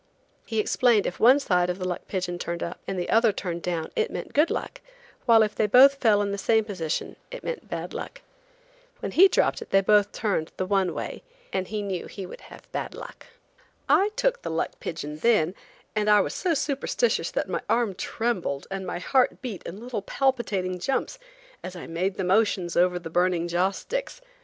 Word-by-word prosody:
He 220 Hz, -, -1 dB
explained 225 Hz, -1 st, +3 dB
if -, -, -3 dB
one 255 Hz, +5 st, +7 dB
side 180 Hz, -9 st, +1 dB
of 180 Hz, -, -2 dB
the 185 Hz, -1 st, -3 dB
luck 180 Hz, -, -4 dB
pigeon 180 Hz, -2 st, -3 dB
turned 170 Hz, -1 st, -3 dB
up 170 Hz, -, -5 dB
and 195 Hz, -, -3 dB
the 175 Hz, -, -2 dB
other 225 Hz, 0 st, +5 dB
turned 175 Hz, -4 st, -4 dB
down 170 Hz, -3 st, -3 dB
it 450 Hz, +1 st, +1 dB
meant -, -, -6 dB
good 300 Hz, +3 st, +4 dB
luck, -, -, -4 dB, 0.5 s
while 225 Hz, -2 st, +7 dB
if 215 Hz, -, -1 dB
they 215 Hz, -, +1 dB
both 260 Hz, +6 st, +8 dB
fell 210 Hz, -5 st, +4 dB
in 200 Hz, -, -2 dB
the 200 Hz, -, -3 dB
same 220 Hz, +2 st, +2 dB
position 175 Hz, -7 st, -3 dB
it -, -, -8 dB
meant 485 Hz, -, -5 dB
bad -, -, -5 dB
luck. -, -, -7 dB, 0.8 s
When -, -, -4 dB
he 380 Hz, +3 st, +7 dB
dropped -, -, +1 dB
it -, -, -9 dB
they 195 Hz, -, +5 dB
both 205 Hz, +1 st, +4 dB
turned 195 Hz, -7 st, -2 dB
the 185 Hz, -, -1 dB
one 190 Hz, -2 st, +1 dB
way, -, -, -5 dB, 0.3 s
and 185 Hz, -, -1 dB
he 215 Hz, -1 st, -3 dB
knew 190 Hz, -3 st, -3 dB
he 195 Hz, -, -7 dB
would -, -, -10 dB
have -, -, -14 dB
bad -, -, -4 dB
luck. -, -, -10 dB, 0.6 s
I 400 Hz, +2 st, +4 dB
took -, -, +1 dB
the -, -, -5 dB
luck -, -, -2 dB
pigeon 150 Hz, -2 st, -5 dB
then, 185 Hz, -3 st, +3 dB, 0.4 s
and 210 Hz, 0 st, +1 dB
I 210 Hz, 0 st, +7 dB
was -, -, -2 dB
so 355 Hz, -4 st, 0 dB
superstitious 285 Hz, -, 0 dB
that -, -, -2 dB
my -, -, -2 dB
arm 235 Hz, -4 st, +2 dB
trembled 185 Hz, -9 st, -2 dB
and 190 Hz, -1 st, -4 dB
my 180 Hz, -, -3 dB
heart 250 Hz, +8 st, +2 dB
beat 220 Hz, -8 st, -5 dB
in 185 Hz, +4 st, -7 dB
little 245 Hz, -4 st, -4 dB
palpitating 205 Hz, -7 st, -1 dB
jumps 270 Hz, -, -2 dB, 0.4 s
as 185 Hz, -, -7 dB
I 175 Hz, -, -7 dB
made 185 Hz, +4 st, -2 dB
the 190 Hz, -, -2 dB
motions 190 Hz, -2 st, +1 dB
over 180 Hz, 0 st, +3 dB
the 170 Hz, -2 st, -7 dB
burning 175 Hz, 0 st, +1 dB
joss 180 Hz, +3 st, +1 dB
sticks. -, -, -4 dB
200 Hz, 205 wpm, -26 LUFS, 180-240 Hz, 0.8 s, both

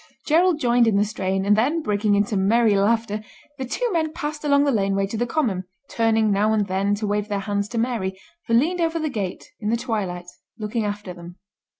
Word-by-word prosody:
Gerald 330 Hz, +1 st, +3 dB
joined 240 Hz, -3 st, +3 dB
in 220 Hz, -, +3 dB
the 205 Hz, -, +3 dB
strain, 195 Hz, -2 st, -2 dB
and 205 Hz, +1 st, +4 dB
then, 290 Hz, +9 st, +1 dB
breaking 205 Hz, -2 st, +1 dB
into 205 Hz, +1 st, +1 dB
merry 215 Hz, +3 st, +3 dB
laughter, 210 Hz, +1 st, +1 dB, 0.4 s
the 260 Hz, -, -2 dB
two 485 Hz, -, -1 dB
men 320 Hz, -3 st, 0 dB
passed 295 Hz, -1 st, -5 dB
along 285 Hz, -1 st, +4 dB
the 285 Hz, -, +2 dB
laneway 195 Hz, -3 st, +1 dB
to 200 Hz, -, -6 dB
the 240 Hz, +2 st, -1 dB
common, 220 Hz, -10 st, -1 dB, 0.3 s
turning 225 Hz, -2 st, +2 dB
now 210 Hz, +2 st, +2 dB
and 210 Hz, -2 st, +2 dB
then 195 Hz, +2 st, 0 dB
to 210 Hz, +1 st, -4 dB
wave 205 Hz, 0 st, -1 dB
their 205 Hz, -1 st, -1 dB
hands 200 Hz, 0 st, -2 dB
to 235 Hz, -, -5 dB
Mary, 225 Hz, -6 st, -1 dB, 0.3 s
who 230 Hz, -, +2 dB
leaned 340 Hz, +9 st, +2 dB
over 330 Hz, 0 st, +1 dB
the 315 Hz, -1 st, -1 dB
gate, 200 Hz, -8 st, -5 dB
in 210 Hz, -, -2 dB
the 230 Hz, -, +2 dB
twilight, 205 Hz, -7 st, -3 dB, 0.3 s
looking 215 Hz, +1 st, -2 dB
after 205 Hz, -2 st, -4 dB
them. 175 Hz, 0 st, -11 dB
215 Hz, 215 wpm, -23 LUFS, 200-245 Hz, 0.4 s, and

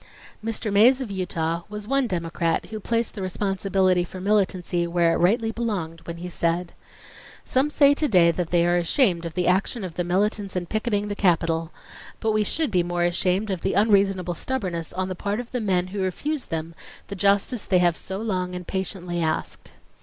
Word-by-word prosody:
Mr. 225 Hz, -1 st, -2 dB
Mays 240 Hz, +6 st, +6 dB
of 250 Hz, -6 st, -5 dB
Utah 170 Hz, -3 st, -2 dB
was 210 Hz, 0 st, -7 dB
one 275 Hz, 0 st, +1 dB
Democrat 170 Hz, -3 st, -1 dB
who 215 Hz, -, -4 dB
placed 230 Hz, +2 st, -1 dB
the 205 Hz, -, -6 dB
responsibility 190 Hz, -1 st, +1 dB
for 185 Hz, +1 st, -9 dB
militancy 185 Hz, -3 st, +1 dB
where 170 Hz, -1 st, +2 dB
it -, -, +1 dB
rightly 225 Hz, +6 st, +2 dB
belonged 195 Hz, -9 st, -3 dB
when 170 Hz, 0 st, -5 dB
he 175 Hz, +1 st, -6 dB
said: 170 Hz, 0 st, -1 dB, 0.7 s
"Some 265 Hz, +3 st, +1 dB
say 285 Hz, -1 st, +5 dB
to 300 Hz, +1 st, 0 dB
day 180 Hz, -8 st, +5 dB
that 170 Hz, 0 st, -3 dB
they 170 Hz, -1 st, +3 dB
are 175 Hz, 0 st, +3 dB
ashamed 175 Hz, -, +2 dB
of 165 Hz, -1 st, -6 dB
the 180 Hz, -, 0 dB
action 195 Hz, +5 st, +1 dB
of 180 Hz, -3 st, -5 dB
the 175 Hz, -, -2 dB
militants 200 Hz, +2 st, 0 dB
in 180 Hz, -1 st, -1 dB
picketing 210 Hz, +1 st, -1 dB
the 205 Hz, -, -3 dB
Capitol:... 165 Hz, -4 st, +1 dB, 0.5 s
But 220 Hz, -, 0 dB
we 215 Hz, 0 st, +2 dB
should 310 Hz, +6 st, -1 dB
be 180 Hz, -2 st, +3 dB
more 175 Hz, 0 st, -1 dB
ashamed 185 Hz, +4 st, +1 dB
of 185 Hz, -3 st, -3 dB
the 190 Hz, -, -1 dB
unreasonable 195 Hz, -3 st, +3 dB
stubbornness 180 Hz, -6 st, -3 dB
on 185 Hz, 0 st, -2 dB
the 185 Hz, -, -3 dB
part 200 Hz, +4 st, -3 dB
of 245 Hz, -1 st, -7 dB
the 250 Hz, -, -2 dB
men 185 Hz, -4 st, +1 dB
who 200 Hz, -, -2 dB
refused 270 Hz, -, -2 dB
them 165 Hz, 0 st, -4 dB, 0.4 s
the 200 Hz, -, -5 dB
justice 200 Hz, +4 st, +1 dB
they 185 Hz, -, +4 dB
have 175 Hz, -2 st, +3 dB
so 190 Hz, +3 st, -5 dB
long 185 Hz, -4 st, -2 dB
and 180 Hz, 0 st, -6 dB
patiently 180 Hz, -2 st, -3 dB
asked." 160 Hz, -1 st, -3 dB
185 Hz, 200 wpm, -24 LUFS, 175-210 Hz, 0.7 s, Mays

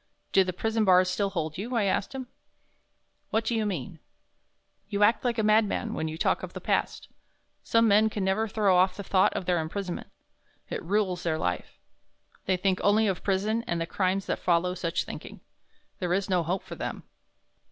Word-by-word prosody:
"Do 190 Hz, -, +5 dB
the 185 Hz, -, -2 dB
prison 220 Hz, +4 st, 0 dB
bars 185 Hz, -2 st, +5 dB
still 200 Hz, +2 st, 0 dB
hold 160 Hz, -4 st, -3 dB
you," 240 Hz, +5 st, -4 dB
I 225 Hz, -, +2 dB
asked 200 Hz, +5 st, -1 dB
him. 260 Hz, -1 st, -4 dB, 1.0 s
"What 225 Hz, +1 st, 0 dB
do 235 Hz, -, 0 dB
you 220 Hz, -2 st, 0 dB
mean?" 165 Hz, -3 st, -5 dB, 0.9 s
"You 205 Hz, -1 st, +1 dB
act 220 Hz, +3 st, +4 dB
like 245 Hz, -2 st, 0 dB
a 220 Hz, -, +1 dB
mad 215 Hz, +1 st, +5 dB
man 220 Hz, +2 st, -3 dB
when 160 Hz, -, -2 dB
you 160 Hz, 0 st, -5 dB
talk -, -, +1 dB
of -, -, -7 dB
the -, -, -6 dB
past. -, -, -1 dB, 0.6 s
Some 230 Hz, 0 st, +3 dB
men 215 Hz, +1 st, +5 dB
can 210 Hz, -2 st, -3 dB
never 195 Hz, +4 st, +1 dB
throw 205 Hz, -3 st, +2 dB
off 185 Hz, +1 st, +3 dB
the 200 Hz, -, -5 dB
thought 190 Hz, -1 st, +3 dB
of -, -, -3 dB
their 175 Hz, -1 st, +2 dB
imprisonment. 175 Hz, +3 st, -4 dB, 0.6 s
It -, -, -3 dB
rules 185 Hz, -1 st, 0 dB
their 160 Hz, -3 st, 0 dB
life. 90 Hz, -, -3 dB, 0.7 s
They 185 Hz, -, +2 dB
think 185 Hz, 0 st, +1 dB
only 210 Hz, +2 st, +4 dB
of 195 Hz, -3 st, -1 dB
prison 210 Hz, +4 st, 0 dB
and 170 Hz, -7 st, -1 dB
the 165 Hz, -, -1 dB
crimes 190 Hz, +2 st, 0 dB
that -, -, -2 dB
follow 180 Hz, 0 st, +1 dB
such 170 Hz, -2 st, -1 dB
thinking. -, -, -9 dB, 0.6 s
There 180 Hz, -2 st, 0 dB
is 195 Hz, +1 st, -1 dB
no 180 Hz, -1 st, +3 dB
hope 175 Hz, +4 st, -2 dB
for -, -, -9 dB
them. -, -, -5 dB
195 Hz, 200 wpm, -27 LUFS, 180-215 Hz, 1.0 s, Do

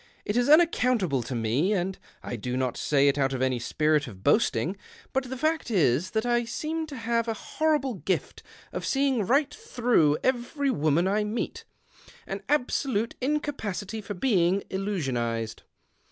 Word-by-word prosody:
It 205 Hz, -, -1 dB
is 245 Hz, +2 st, +2 dB
unaccountable 250 Hz, -, +4 dB
to 120 Hz, +2 st, -5 dB
me, 120 Hz, -, +1 dB
and 190 Hz, -1 st, -2 dB, 0.2 s
I -, -, -4 dB
do 125 Hz, +3 st, -3 dB
not 130 Hz, -2 st, -1 dB
say 140 Hz, -1 st, +2 dB
it 140 Hz, +1 st, +2 dB
out 135 Hz, -1 st, +1 dB
of 130 Hz, -, -3 dB
any 130 Hz, -2 st, +1 dB
spirit 150 Hz, +4 st, +1 dB
of 95 Hz, -5 st, -11 dB
boasting, 170 Hz, -, +2 dB, 0.4 s
]jut 265 Hz, -1 st, -1 dB
the 260 Hz, -, -4 dB
fact 315 Hz, +1 st, 0 dB
is 170 Hz, -, +2 dB
that 220 Hz, +3 st, -1 dB
I 240 Hz, 0 st, +2 dB
seem 315 Hz, +7 st, -3 dB
to 290 Hz, -, -8 dB
have 230 Hz, -1 st, -1 dB
a 225 Hz, -, -1 dB
horrible 295 Hz, +1 st, 0 dB
gift 190 Hz, -1 st, -3 dB, 0.3 s
of -, -, -4 dB
seeing 270 Hz, -5 st, +1 dB
right 280 Hz, +3 st, +2 dB
through 245 Hz, -, +2 dB
every 260 Hz, +2 st, 0 dB
woman 155 Hz, -, +2 dB
I 210 Hz, +2 st, +1 dB
meet 210 Hz, +3 st, -4 dB, 0.3 s
— -, -, -22 dB
an 195 Hz, +1 st, -5 dB
absolute 250 Hz, -5 st, 0 dB
incapacity 225 Hz, -8 st, -2 dB
for 205 Hz, 0 st, -6 dB
being 190 Hz, -3 st, +2 dB
illusionized. 125 Hz, -, -2 dB
205 Hz, 165 wpm, -27 LUFS, -, 0.4 s, unaccountable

